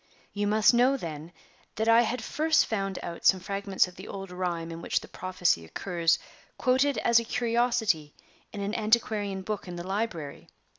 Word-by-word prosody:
"You 205 0 -1
must 215 +3 +4
know, 250 +3 +4
then, 160 - -7 0.4
that 220 +1 -1
I 230 +1 +7
had 240 +2 -2
first 315 0 +2
found 195 -3 -2
out 170 -1 -7
some 190 - +5
fragments 195 0 0
of 180 - -14
the 190 - -9
old 195 -2 -7
rhyme 175 -2 -3
in 165 0 -7
which - - 0
the - - -11
prophecy 180 - 0
occurs 170 - 0 0.4
quoted 260 +1 +2
as 235 +2 +4
a - - -3
curiosity 230 -9 0 0.4
in 205 - -6
an 200 +1 -2
antiquarian 215 -3 0
book 210 0 -4
in 175 - -6
the 175 0 -6
library. 190 -7 -4
200 Hz, 180 wpm, -28 LUFS, 180-230 Hz, 0.4 s, I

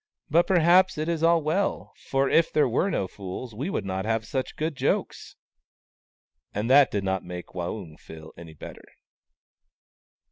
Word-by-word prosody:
" - - -50
But 170 +3 +4
perhaps 180 +1 +4
it 155 +1 -2
is 165 -1 -1
as 165 0 +4
well, 165 +7 -1 0.2
for 135 0 +2
if 165 +3 +3
there 150 -2 +3
were 125 - +1
no 95 - -1
fools 100 +6 -8
we 135 - -4
would 105 - -3
not 95 0 -3
have 110 +1 -1
such 130 +3 -4
good 155 0 -2
jokes! - - -2 0.6
" 65 -1 -58
And 110 +5 -1
that 140 0 +7
did 100 -1 -2
not 95 -1 -1
make 90 0 -8
Waung 90 -2 -6
feel 80 -1 -12
any 80 -2 -12
better. - - -11
120 Hz, 175 wpm, -26 LUFS, -, 0.6 s, that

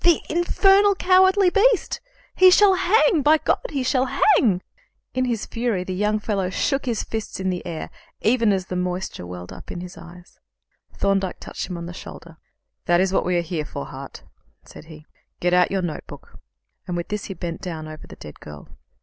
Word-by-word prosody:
"The 345 -2 +5
infernal 390 +4 +4
cowardly 375 0 +4
beast! 435 +1 +2 0.3
He 370 0 +7
shall 390 +1 +6
hang! 375 -1 +3
By 305 +3 +5
God, - - 0
he 275 -3 -2
shall 255 +1 +1
hang!" 215 - +3 0.5
In 255 0 0
his 235 -4 -2
fury 230 -6 -2
the 185 - -5
young 210 +3 +1
fellow 200 -3 -2
shook 275 +8 -1
his 230 -3 -1
fists 220 -3 -5
in 190 0 -1
the 180 - -4
air, 160 -2 -6 0.3
even 230 -1 +3
as 190 -2 0
the 185 - -5
moisture 180 - -3
welled 90 0 -8
up - - -12
into 175 - -6
his 175 -2 -10
eyes. 175 +1 -14 0.5
Thorndyke 195 -2 -1
touched - - -6
him 180 - -4
on 170 - -6
the 175 - -7
shoulder. 170 -2 -11 0.5
"That 175 0 +3
is 190 0 +1
what - - +1
we 180 -1 +2
are - - +2
here 170 -2 -3
for, 145 -1 -6
Hart," 135 0 -10 0.4
said - - -13
he. 155 -1 -13 0.3
"Get 175 0 +1
out 180 0 +4
your 195 -1 -1
notebook;" 160 -4 -8 0.5
and 175 - -3
with 170 - -5
this 210 -1 -3
he 195 - -6
bent 170 -1 -5
down 160 -4 -6
over 155 0 -10
the - - -11
dead 75 - -12
girl. 75 -1 -11
190 Hz, 200 wpm, -23 LUFS, 175-275 Hz, 0.5 s, He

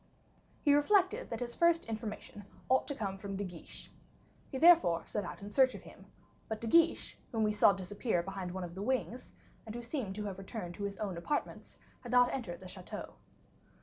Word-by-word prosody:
He 290 - +5
reflected 395 +9 +3
that - - -4
his 240 -1 -3
first 340 -1 +3
information 215 -2 -6 0.2
ought 260 +1 +3
to 285 - -3
come 195 -5 -3
from 195 0 -5
De 200 - -2
Guiche. 180 -4 -9 0.6
He 265 - -4
therefore 325 - +6
set 210 - -2
out 185 - -7
in 205 - -7
search 260 +2 +4
of - - -9
him, - - -14 0.4
but 220 -1 -3
De 230 - -5
Guiche, 335 +8 +3
whom 225 -2 +1
we 210 0 +2
saw 210 - +6
disappear 195 0 -1
behind 190 -1 -5
one 185 0 -4
of 170 -1 -6
the 190 - -6
wings, 250 +1 -2 0.3
and 220 0 -8
who 240 - -5
seemed 230 -7 -3
to 210 0 -4
have 195 -2 -5
returned 190 -2 -6
to 200 +2 -4
his 200 -1 -4
own 200 -5 -3
apartments, 290 +13 -3 0.2
had 240 - -8
not 245 0 +5
entered 190 -11 -4
the 185 - -9
chateau. 180 0 -8
215 Hz, 205 wpm, -33 LUFS, 190-260 Hz, 0.6 s, therefore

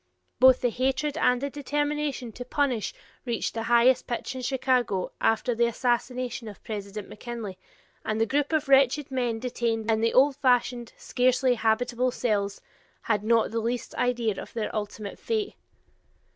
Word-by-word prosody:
Both 260 0 +7
the 245 - +1
hatred 265 +4 0
and 250 0 +2
the 280 0 -3
determination 290 -3 -2
to 245 - -7
punish 255 -3 0 0.3
reached 235 -3 -2
the 225 - -3
highest 240 +2 +4
pitch 240 +2 -3
in 260 - -6
Chicago 250 -6 0
after 225 +2 +2
the 235 +1 +2
assassination 245 0 -1
of 205 - -10
President 205 -2 -6
McKinley, 215 -4 -7 0.4
and 215 0 -2
the 225 - +3
group 285 +5 0
of 315 -4 +1
wretched 270 +1 +4
men 245 -3 -1
detained 230 -2 -1
in 220 0 +1
the 230 0 +1
old 275 +1 +5
fashioned, 245 -3 +1
scarcely 250 +1 +2
habitable 240 +2 +1
cells, 205 -5 -1 0.4
had 210 -2 0
not 230 +1 +2
the 230 - -1
least 235 +2 -3
idea 240 -4 0
of - - -11
their 225 -1 -3
ultimate 210 -1 -5
fate. 435 -3 -2
245 Hz, 160 wpm, -27 LUFS, 225-260 Hz, 0.4 s, Both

